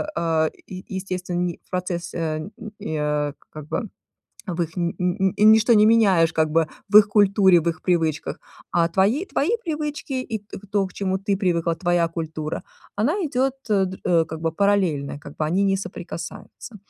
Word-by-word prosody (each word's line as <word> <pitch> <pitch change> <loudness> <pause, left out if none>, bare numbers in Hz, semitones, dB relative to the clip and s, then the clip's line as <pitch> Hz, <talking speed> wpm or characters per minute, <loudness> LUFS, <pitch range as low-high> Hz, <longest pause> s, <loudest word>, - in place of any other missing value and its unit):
а, 160 -1 +1 0.2
е 185 - -7
е 185 - -10
естественный 180 -2 -3
процесс, 175 -1 -3
э, 160 -2 -2
н 155 +6 -7 0.3
э, 150 -2 -1 0.2
как 155 -1 -9
бы 220 +6 -3 0.6
в 175 -1 -2
их 165 +1 -4
ни 170 -1 -1
ни 185 +2 0
ничто 220 +2 +6
не 210 0 +6
меняешь 195 -7 +4
как 160 -1 +2
бы 160 0 +2 0.2
в 210 - +8
их 205 -1 +7
культуре, 195 -3 +5
в 170 - -4
их 160 - -5
привычках, 165 -4 0 0.3
а 170 -1 +3
твои, 200 - +1
твои 360 -3 -1 0.2
привычки 300 -3 -3
и 220 -3 -4
т 205 +1 -11
то, 200 -2 +1
к 185 - -16
чему 190 -1 -1
ты 200 0 0
привыкла, 170 -3 0
твоя 175 -1 +1
культура, 160 -2 -5 0.3
она 235 - +1
идёт, 265 -2 0 0.2
э, 200 -2 +3
др 185 +1 -7
э, 170 -2 +4
как 160 0 -7
бы 165 0 0
параллельно, 175 -8 +1
как 145 - -12
бы - - -2
они 180 +6 +1
не 195 -1 +2
соприкасаются. 180 +4 -8
180 Hz, 180 wpm, -23 LUFS, 165-205 Hz, 0.6 s, в